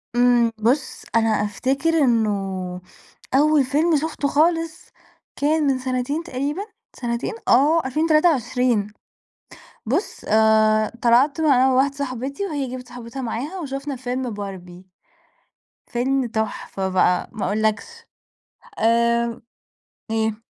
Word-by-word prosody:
إمم. 240 -1 +4
بُص، 250 +6 0
أنا 225 0 +3
أفتكر 235 +8 0
إنه 235 -7 +3 1.1
أول 300 0 +4
فيلم 305 +5 +1
شُفته 300 -1 -2
خالص 325 +2 0 0.5
كان 305 +2 +1
من 265 -1 +1
سَنتين 255 +5 -2
تقريبًا، 290 +3 -3 0.3
سَنتين 235 - -3
آه، 300 +6 +4
2023. 255 - +1 0.9
بُص، 295 - -2
آآ 215 0 +3
طلعت 260 +6 +3
مع 265 -4 +4
واحدة 270 +2 +2
صاحبتي 275 +5 -4
وهي 290 -7 -3
جابت 250 -1 -8
صاحبتها 245 +2 -8
معاها 280 +11 -4
وشُفنا 275 -1 -5
فيلم 250 0 -3
باربي. 190 -3 -8 1.0
فيلم 260 +2 0
تُحفة 215 -3 -3
بقى 180 -1 +1
ما 215 - -3
أقول 210 +3 -1
لكش. 215 -1 +1 0.9
آمم 235 +1 +1 0.7
إيه؟ 220 0 -1
255 Hz, 110 wpm, -22 LUFS, 225-285 Hz, 1.1 s, إمم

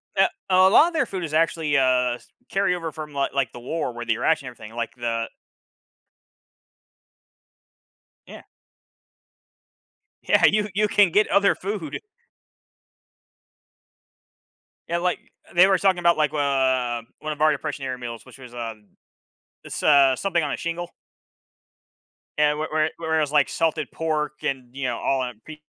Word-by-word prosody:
Eh - - +5 0.2
a 185 0 +6
lot 300 - +6
of 345 - -5
their 310 -5 +1
food 190 -5 -5
is 155 - -8
actually, 160 -1 +1
uh, 125 -2 +2 0.4
carryover 180 -5 0
from, 155 -1 -7
like 140 -1 -1
like, 135 -5 0
the - - -10
war 130 +2 -3
where 120 0 -6
they're 115 +1 -1
rationing 160 -5 +1
everything, 110 -2 -12
like, 115 -1 -4
the 115 -2 -2 3.0
Yeah. - - -11 1.8
Yeah, - - +4
you 210 0 +3
you 210 +2 +2
can 205 -3 +4
get 210 +5 +3
other 200 +1 +3
food. 190 -6 -5 2.9
Yeah, 170 +1 -1
like, 180 0 0 0.3
they 180 +2 +7
were 195 -1 +3
talking 190 -2 +2
about. 170 0 +3
like, 155 -1 +1
uh, 130 -4 +1 0.2
one 155 0 -4
of 150 - -11
our 155 - +5
depression 140 -1 -4
era 130 -1 -3
meals, 120 -2 -8
which - - -15
was 125 -2 -13
a 115 -2 -5 0.9
it's, - - -6
uh, 140 -3 +5
something 175 +1 0
on 145 - -2
a - - -2
shingle. 170 +1 -5 1.5
And 150 0 +3
where 155 - -2
where 155 0 +1
where 160 -1 -1
it - - +2
was, 145 -2 -1
like, 150 -2 +3
salted 160 -3 -1
pork 150 -2 -3
and, 130 -3 -3
you 140 -1 -3
know, 120 -2 -1
all 135 -1 0
that, 125 -3 -6
p 155 -1 -11
150 Hz, 155 wpm, -23 LUFS, 130-170 Hz, 3.0 s, they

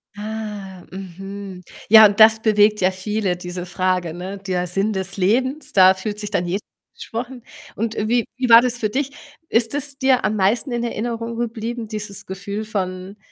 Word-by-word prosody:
Ah, 210 -3 -7
mhm. 195 0 -8 0.3
Ja, 220 0 +10
und 205 0 +2
das 220 0 +7
bewegt 210 -2 +3
ja 185 - +3
viele, 190 0 -2
diese 180 0 -6
Frage, 180 -2 -1
ne? 185 +3 -6
Der 185 -2 -2
Sinn 195 +4 0
des 190 +1 -4
Lebens, 255 +10 +1
da 190 -1 +7
fühlt 205 +2 -5
sich 210 -1 -4
dann 190 -4 -1
jeder 190 +4 -2 0.3
angesprochen, 245 +2 -6 0.3
und 225 +1 -2
wie 230 +2 +1
wie 255 - 0
war 230 0 +10
das 245 -1 -1
für 215 -3 -1
dich? 275 +4 -2 0.4
Ist 230 +2 +1
es 285 -1 -3
dir 265 -4 +2
am 215 +2 0
meisten 215 +7 +1
in 235 0 -2
Erinnerung 230 0 -3
geblieben, 235 0 -4
dieses 210 -2 -6
Gefühl 200 +3 -5
von 190 -1 -4
210 Hz, 175 wpm, -21 LUFS, 190-230 Hz, 0.4 s, Ja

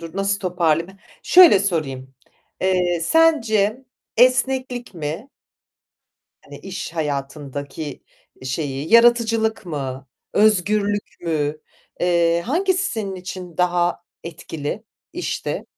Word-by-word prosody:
Dur, 165 +1 -9
nasıl 200 0 0
toparlayayım. 175 0 0 0.3
Şöyle 355 - +7
sorayım. 135 -9 -3 0.5
Eee, 180 -2 +1
sence 230 - +2 0.3
esneklik 255 -1 +2
mi 165 - -5 1.1
hani - - -12
iş - - -7
hayatındaki 145 -1 -5 0.4
şeyi 140 - -3
yaratıcılık 230 -2 +4
mı, 135 -4 -5 0.3
özgürlük 205 0 +1
mü? 155 -3 -1 0.4
Eee, 170 -1 +2
hangisi 375 +7 +1
senin 205 -4 -4
için 180 -1 -8
daha 175 -1 +1 0.2
etkili 165 +3 -6 0.3
işte? 355 - -4
180 Hz, 90 wpm, -21 LUFS, 155-220 Hz, 1.1 s, Şöyle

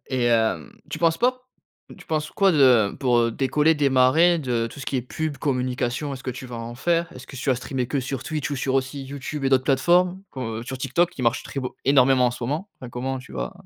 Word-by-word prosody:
Et 130 -2 -1
hem, 110 -9 +1
tu - - -4
penses 165 -1 +2
pas 255 +1 +1 0.6
tu - - -15
penses 155 -1 -2
quoi 195 -1 +3
de 130 - +4
pour, 125 -3 +2
heu, 115 0 +2
décoller, 150 +6 +2
démarrer 145 +4 +4
de 120 -6 -1
tout 145 - -11
ce 135 - -8
qui 135 - -1
est 125 - -1
pub, 155 +4 -4
communication? 130 +1 -2
Est-ce 130 - -10
que 130 - -3
tu 130 +1 -8
vas 120 -1 -7
en 115 +1 -6
faire? 170 +6 0
Est-ce - - -11
que 135 - -10
tu 135 +2 -1
vas - - +4
streamer 125 +1 -3
que 140 +2 -1
sur 130 0 -4
Twitch, 155 -3 -3
ou 145 - -2
sur 135 0 -1
aussi 135 +1 -1
YouTube 140 +1 -6
et 135 - +2
d'autres 130 -1 +3
plateformes? 175 +8 +2
Comme 130 -2 -5 0.2
heu, - - -7
sur 130 +2 -6
TikTok 175 +6 +1
qui 155 - -9
marche 115 -2 +1
très 135 - -5
beau 125 - -6
énormément 130 -1 +5
en - - +1
ce 120 - -8
moment? 155 - -3
Enfin, 125 - -8
comment 130 +2 -3
tu 130 - -13
vas - - -4
135 Hz, 250 wpm, -24 LUFS, 125-150 Hz, 0.6 s, énormément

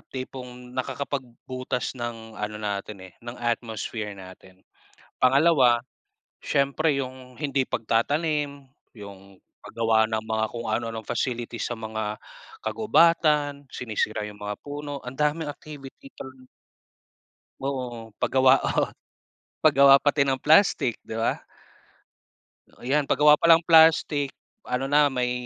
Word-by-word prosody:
tipong 125 -1 -8
nakakapag-butas 130 -1 -4
ng 120 -3 -7
ano 105 0 -4
natin 105 -2 -5
eh, - - -31
ng 120 +1 -8
atmosphere 115 -3 -3
natin. 95 0 -14 0.6
Pangalawa, 130 -3 +4 0.6
siyempre 140 +3 +1
yung 130 -1 -9
hindi 140 -3 0
pagtatanim, 145 +5 -1 0.2
yung 100 -3 -13 0.2
pag-gawa 110 -1 +2
ng 110 0 0
mga 110 0 0
kung 120 0 -5
ano-anong 115 -2 -3
facilities 120 -2 -3
sa - - -4
mga 110 -1 -5 0.4
kagubatan, 155 - +2
sinisira 110 -2 -2
yung 105 0 -12
mga 105 0 -5
puno, 145 -1 -6
ang 125 +1 -9
daming 150 +1 0
activity 140 -2 -11
talaga 130 -1 -11 1.1
Oo 125 -5 -5
pag-gawa 130 0 +4
oh. - - +1 0.7
Pag-gawa 140 -2 +6
pati 145 -1 +2
ng 135 -1 -1
plastik 155 - +4
'di - - -7
ba? 115 - -1 1.4
Yan 140 +3 +1
pag-gawa 150 0 +5
palang 165 0 +5
plastik 160 -4 +5 0.4
ano 125 +1 -1
na 150 0 +5
may, 125 -3 -1
130 Hz, 115 wpm, -25 LUFS, 115-145 Hz, 1.4 s, Pag-gawa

